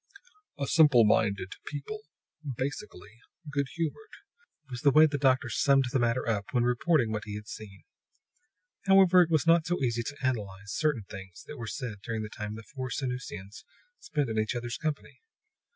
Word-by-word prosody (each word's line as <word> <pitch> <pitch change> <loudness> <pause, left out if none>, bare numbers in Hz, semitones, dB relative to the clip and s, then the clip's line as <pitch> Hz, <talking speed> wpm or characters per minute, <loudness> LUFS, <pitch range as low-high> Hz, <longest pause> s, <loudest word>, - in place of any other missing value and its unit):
"A 140 - -1
simple 140 -6 +6
minded 100 -3 +1
people, 150 +10 -6 0.6
basically 115 -5 -6 0.3
good 140 -1 0
humored," 170 - -3 0.6
was 125 -2 -7
the 145 - +5
way 155 +3 +7
the 145 -2 -1
doctor 130 -3 +3
summed 135 +2 +3
the 135 - +3
matter 120 +1 +1
up 105 -3 0
when 120 -2 +3
reporting 125 0 +2
what 105 -1 -3
he 105 -1 -6
had 105 0 -8
seen. 100 -4 -10 1.0
However, 190 -2 +7
it 170 - +2
was 155 -3 +2
not 165 0 +4
so 175 0 0
easy 120 -2 +1
to 145 +5 -6
analyze 105 -5 -3
certain 150 -6 0
things 95 -2 -10
that 150 - -9
were 115 -2 -6
said 110 -5 -5
during 110 -1 -3
the 105 - -6
time 105 0 -6
the 115 - -9
four 130 +3 -6
Sanusians 125 -7 -5 0.4
spent 150 -5 -1
in 110 -1 -1
each 110 +3 -1
other's 120 0 -3
company. 155 -3 -4
125 Hz, 175 wpm, -29 LUFS, 110-150 Hz, 1.0 s, way